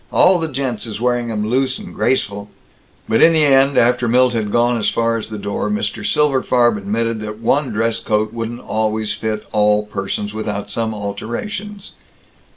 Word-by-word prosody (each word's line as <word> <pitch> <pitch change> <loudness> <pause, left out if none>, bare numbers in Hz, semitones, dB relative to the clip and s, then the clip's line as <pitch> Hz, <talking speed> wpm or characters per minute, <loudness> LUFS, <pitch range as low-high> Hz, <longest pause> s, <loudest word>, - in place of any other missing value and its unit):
All 180 -1 +5
the 165 - -1
gents 130 -6 -3
is 110 -1 -6
wearing 120 0 0
'em 105 -1 -2
loose 130 +2 +1
and - - -9
graceful." 100 -5 -1 0.6
But 110 - +2
in 165 - +7
the 155 -2 +4
end, 135 0 +4
after 125 +1 +3
Milt 125 +1 +3
had 110 -3 -1
gone 120 +2 +2
as 105 - +1
far 115 0 0
as 115 -1 -4
the 110 - -5
door, 100 0 -3
Mr. 210 +2 -2
Silberfarb 130 -5 +2
admitted 110 +3 -2
that 105 0 -6
one 135 +5 +1
dress 115 +1 0
coat 110 0 -1
wouldn't 115 +1 -5
always 110 -1 -1
fit 110 -1 -3
all 105 0 +3
persons 105 0 -4
without 105 -1 -4
some 110 0 -2
alterations. 190 - -5
115 Hz, 175 wpm, -18 LUFS, 105-130 Hz, 0.6 s, in